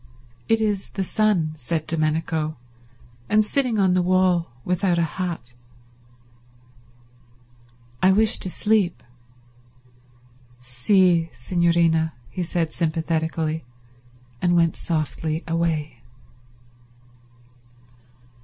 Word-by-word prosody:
"It 225 0 +4
is 205 -3 -1
the 195 - -3
sun," 190 -6 +1
said 155 +3 -3
Domenico, 155 -1 -1 0.7
"and 215 0 +4
sitting 250 -1 0
on 190 -3 +3
the 180 - +3
wall 180 -2 +2 0.2
without 180 0 +1
a 170 - +2
hat." 165 -6 -4 2.5
"I 190 - +5
wish 215 +3 +3
to 185 - -3
sleep." 205 -2 +1 1.6
"Sì 165 +7 +2
signorina," 170 -2 +2 0.2
he 185 - -4
said 165 -2 -2
sympathetically; 160 -1 -1 0.8
and 175 -1 +2
went 165 -1 +3
softly 160 0 -2
away. 160 -6 -1
170 Hz, 90 wpm, -23 LUFS, 160-185 Hz, 2.5 s, I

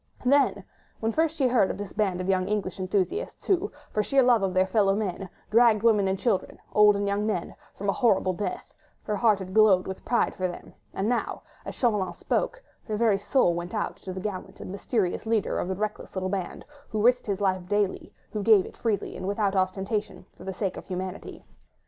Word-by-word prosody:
Then, 280 +2 +3 0.4
when 225 0 0
first 320 +4 +1
she 270 -4 +3
heard 235 -6 +3
of - - -3
this 205 -2 -7
band 195 -4 0
of 180 - -4
young 185 -1 +1
English 205 -3 -2
enthusiasts, 195 - -2
who, 390 +1 +1 0.2
for 215 - +1
sheer 270 +5 +3
love 245 -3 +4
of 195 -1 0
their 185 0 +4
fellow 195 -1 +2
men, 195 -2 -3 0.2
dragged 225 -1 +5
women 210 -4 +4
and 190 0 0
children, 205 -3 -1 0.2
old 210 -1 +6
and 200 0 -1
young 200 +1 0
men, 185 -6 -2 0.2
from 200 - -5
a 200 - +3
horrible 190 -6 +2
death, 205 +3 -5 0.3
her 210 - -2
heart 215 -1 +3
had 185 -1 -7
glowed 210 -4 +5
with 190 0 -6
pride 240 - +1
for 185 -1 -1
them, 175 - -9 0.2
and 195 - -2
now, 240 0 -1 0.2
as - - -6
Chauvelin 205 -7 +1
spoke, - - -2 0.2
her 215 -2 -2
very 215 -3 +3
soul 205 -3 +2
went 175 +4 -5
out 210 - -2
to 190 - -8
the 185 - -5
gallant 190 -1 -6
and - - -7
mysterious 200 0 -1
leader 220 -3 +1
of - - -2
the 190 - -2
reckless 210 +1 -4
little 185 0 -1
band, 190 -2 -4 0.2
who 215 -2 -1
risked 250 0 +3
his 200 -2 -1
life 185 -3 0
daily, 205 -2 0 0.2
who 210 - -3
gave 205 -2 +5
it - - -11
freely 220 -4 -2
and 185 - -5
without 200 -1 0
ostentation, 195 +3 -1
for - - -13
the 190 - -4
sake 195 -1 -2
of - - -9
humanity. 185 +1 -6
205 Hz, 215 wpm, -26 LUFS, 190-220 Hz, 0.4 s, old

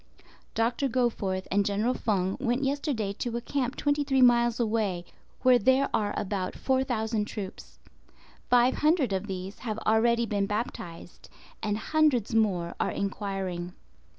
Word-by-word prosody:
Dr. 240 +4 +1
Goforth 215 -6 -1
and 200 +1 +3
General 205 +5 0
Feng 195 -6 0
went 245 +1 0
yesterday 270 -7 -1
to 235 -1 -2
a - - -1
camp 260 +1 -2
23 285 -2 +1
miles 240 -1 +4
away, 215 -6 0 0.4
where 255 -1 +6
there 260 +5 +3
are 205 -1 +1
about 190 -2 -2
4,000 240 -5 0
troops. 205 -3 -8 0.7
Five 245 +1 +5
hundred 300 - +2
of 190 +2 -2
these 190 0 -6
have 220 -3 -4
already 235 +2 +3
been 200 -2 -1
baptized, 185 -6 -5 0.3
and 210 -1 -1
hundreds 280 -4 +1
more 190 -6 +1
are - - +1
enquiring. 195 -3 -3
225 Hz, 135 wpm, -28 LUFS, 200-250 Hz, 0.7 s, where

